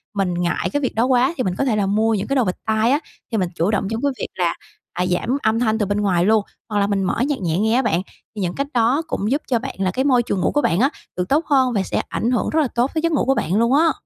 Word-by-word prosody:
mình 195 Hz, -3 st, 0 dB
ngại 175 Hz, 0 st, -1 dB
cái 290 Hz, -, 0 dB
việc 260 Hz, -, -2 dB
đó 230 Hz, +2 st, +2 dB
quá 255 Hz, +3 st, +3 dB
thì 255 Hz, -, 0 dB
mình 185 Hz, -5 st, -1 dB
có 275 Hz, -, 0 dB
thể 240 Hz, -5 st, +1 dB
là 205 Hz, -2 st, +1 dB
mua 215 Hz, +3 st, +2 dB
những 200 Hz, -2 st, -2 dB
cái 275 Hz, -, 0 dB
đồ 260 Hz, -, +3 dB
bịt 185 Hz, -, -1 dB
tai 220 Hz, +2 st, +2 dB
á, 285 Hz, -, +3 dB, 0.3 s
thì 225 Hz, -, 0 dB
mình 180 Hz, -3 st, 0 dB
chủ 175 Hz, +4 st, +1 dB
động 200 Hz, -2 st, 0 dB
trong 225 Hz, +1 st, -2 dB
cái 285 Hz, -, +1 dB
việc -, -, -2 dB
là, 175 Hz, -2 st, 0 dB, 0.4 s
à, 180 Hz, +1 st, -1 dB
giảm 185 Hz, +9 st, 0 dB
âm 220 Hz, +1 st, +2 dB
thanh 220 Hz, -2 st, +1 dB
từ 215 Hz, -, 0 dB
bên 205 Hz, +1 st, -1 dB
ngoài 180 Hz, -4 st, +2 dB
luôn, 215 Hz, 0 st, +3 dB, 0.3 s
hoặc 210 Hz, -1 st, 0 dB
là 200 Hz, -, +2 dB
mình 200 Hz, -1 st, 0 dB
mở 185 Hz, -, 0 dB
nhạc 290 Hz, -2 st, -1 dB
nhẹ 165 Hz, -2 st, 0 dB
nghe 220 Hz, +2 st, +2 dB
á 260 Hz, -, +4 dB
bạn. 200 Hz, -8 st, +1 dB, 0.3 s
Thì 210 Hz, -, -4 dB
những 180 Hz, -1 st, -2 dB
cách 280 Hz, -, -2 dB
đó 245 Hz, +5 st, +2 dB
cũng 210 Hz, -7 st, -2 dB
giúp 285 Hz, +3 st, +1 dB
cho 240 Hz, -3 st, +1 dB
bạn -, -, -6 dB
là 190 Hz, -1 st, +1 dB
cái 260 Hz, +8 st, -1 dB
môi 250 Hz, -4 st, +4 dB
trường 200 Hz, -5 st, -2 dB
ngủ -, -, +1 dB
của 290 Hz, -, +1 dB
bạn 175 Hz, -, +1 dB
á 265 Hz, +4 st, +4 dB, 0.3 s
được 180 Hz, 0 st, -2 dB
tốt 300 Hz, +4 st, +2 dB
hơn 260 Hz, -4 st, +2 dB
và 200 Hz, -3 st, +1 dB
sẽ -, -, -1 dB
ảnh 235 Hz, -, -1 dB
hưởng 245 Hz, -, 0 dB
rất 315 Hz, -, +2 dB
là 290 Hz, -, +1 dB
tốt 245 Hz, +3 st, +1 dB
tới 315 Hz, -, 0 dB
giấc 335 Hz, +1 st, +1 dB
ngủ 295 Hz, -, +1 dB
của 270 Hz, +1 st, +2 dB
bạn 185 Hz, -, -1 dB
luôn 235 Hz, +3 st, +3 dB
á. 325 Hz, +2 st, +4 dB
220 Hz, 325 wpm, -21 LUFS, 195-260 Hz, 0.4 s, á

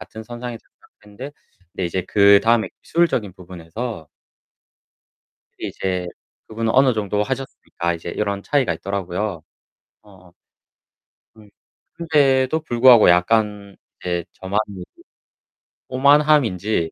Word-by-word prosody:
같은 110 Hz, -, -10 dB
선상에서 120 Hz, +1 st, -7 dB, 0.4 s
시작했는데 125 Hz, +8 st, -10 dB, 0.4 s
근데 95 Hz, -, -3 dB
이제 90 Hz, +2 st, -2 dB
그다음에 105 Hz, +3 st, +4 dB
기술적인 135 Hz, -, 0 dB
부분에서 90 Hz, +1 st, -8 dB, 1.5 s
그 -, -, -6 dB
이제 90 Hz, -2 st, -3 dB, 0.4 s
그분은 110 Hz, 0 st, -2 dB
어느 130 Hz, -1 st, +4 dB
정도 105 Hz, -1 st, -1 dB
하셨으니까 130 Hz, -9 st, -4 dB
이제 85 Hz, 0 st, -7 dB
이런 100 Hz, +1 st, -3 dB
차이가 135 Hz, -, +1 dB
있더라고요. 95 Hz, 0 st, -4 dB, 0.6 s
어어. 95 Hz, -4 st, -19 dB, 1.0 s
음 105 Hz, -2 st, -17 dB, 0.4 s
근데도 145 Hz, -3 st, +2 dB
불구하고 120 Hz, -, +6 dB
약간 100 Hz, +2 st, +1 dB, 0.3 s
이제 85 Hz, -2 st, -3 dB
저만의 95 Hz, -1 st, -4 dB, 1.0 s
오만함인지 130 Hz, -, +2 dB
105 Hz, 270 characters per minute, -21 LUFS, 95-125 Hz, 1.5 s, 불구하고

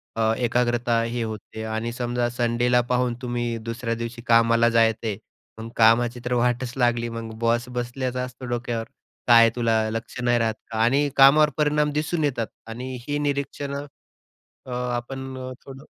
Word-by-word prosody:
अ, 110 Hz, 0 st, +2 dB
एकाग्रता 120 Hz, -1 st, +1 dB
हे 115 Hz, 0 st, -2 dB
होते. 110 Hz, 0 st, -6 dB
आणि 110 Hz, +1 st, -3 dB
समजा 120 Hz, -1 st, -1 dB
संडेला 120 Hz, 0 st, +2 dB
पाहून 125 Hz, -1 st, +1 dB
तुम्ही 120 Hz, -2 st, -2 dB
दुसऱ्या 115 Hz, 0 st, -2 dB
दिवशी 115 Hz, +1 st, -6 dB
कामाला 115 Hz, 0 st, +5 dB
जायचंय. 115 Hz, -2 st, +1 dB, 0.4 s
मग 115 Hz, +1 st, -6 dB
कामाची 120 Hz, +2 st, +4 dB
तर 125 Hz, -, -1 dB
वाटच 120 Hz, 0 st, 0 dB
लागली. 120 Hz, -2 st, +1 dB
मग 115 Hz, -1 st, -6 dB
बॉस 120 Hz, +1 st, +1 dB
बसलाच 125 Hz, +1 st, -3 dB
असतो 125 Hz, 0 st, -10 dB
डोक्यावर. 120 Hz, -2 st, -3 dB, 0.4 s
"काय 115 Hz, -1 st, +7 dB
तुला 115 Hz, -2 st, +2 dB
लक्ष 115 Hz, +3 st, -5 dB
नाही 120 Hz, -1 st, +2 dB
राहत 110 Hz, -1 st, 0 dB, 0.2 s
का?" 110 Hz, -, -3 dB
आणि 140 Hz, +5 st, +3 dB
कामावर 150 Hz, +3 st, +7 dB
परिणाम 150 Hz, 0 st, +2 dB
दिसून 155 Hz, +2 st, -1 dB
येतात. 120 Hz, -6 st, 0 dB, 0.2 s
आणि 125 Hz, +3 st, -6 dB
ही 145 Hz, 0 st, -1 dB
निरीक्षणं 140 Hz, 0 st, -3 dB, 0.8 s
अ, -, -, -9 dB, 0.3 s
आपण 130 Hz, +2 st, -6 dB, 0.3 s
थोडं 135 Hz, +1 st, -11 dB
120 Hz, 150 wpm, -24 LUFS, 115-130 Hz, 0.8 s, काय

